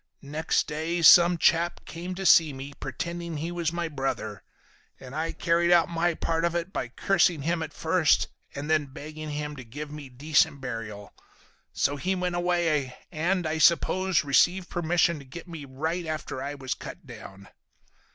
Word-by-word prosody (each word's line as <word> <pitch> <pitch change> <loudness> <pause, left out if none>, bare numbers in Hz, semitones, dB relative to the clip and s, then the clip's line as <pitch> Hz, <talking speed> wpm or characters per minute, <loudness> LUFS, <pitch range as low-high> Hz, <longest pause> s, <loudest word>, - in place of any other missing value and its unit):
"Next 150 +3 0
day 160 +3 -2
some 175 +1 +8
chap 170 +1 +2
came 175 +3 -6
to 195 +1 -5
see 160 -5 +6
me, 135 +2 -8
pretending 170 +4 -5
he 165 +4 -4
was 170 -2 -1
my 170 0 -2
brother. 135 - -3 0.6
And 130 0 -11
I 160 +2 -2
carried 170 0 +1
out 170 -1 +5
my 170 0 0
part 165 0 -1
of 170 0 0
it 170 +3 -3
by - - -2
cursing 170 +3 +1
him 170 +2 0
at 160 -1 -4
first 165 -1 +2 0.3
and 140 +1 -5
then 155 -2 +2
begging 155 +3 -8
him 150 0 -4
to 130 - -8
give 145 +6 -8
me 150 -3 -8
decent 145 +3 +1
burial. 115 -5 -6 0.6
So 145 - 0
he 185 +8 -1
went 180 -1 -2
away, 170 -7 0
and, 175 +2 0
I 160 0 -1
suppose, 180 +1 +3
received 175 +6 +2
permission 170 -1 +1
to - - -11
get 170 +7 -10
me 165 -4 -8
right 160 +6 -3
after 155 -4 -4
I 145 +2 -4
was 130 -2 -3
cut 180 - -10
down. 105 -5 -11
160 Hz, 175 wpm, -27 LUFS, 140-170 Hz, 0.6 s, some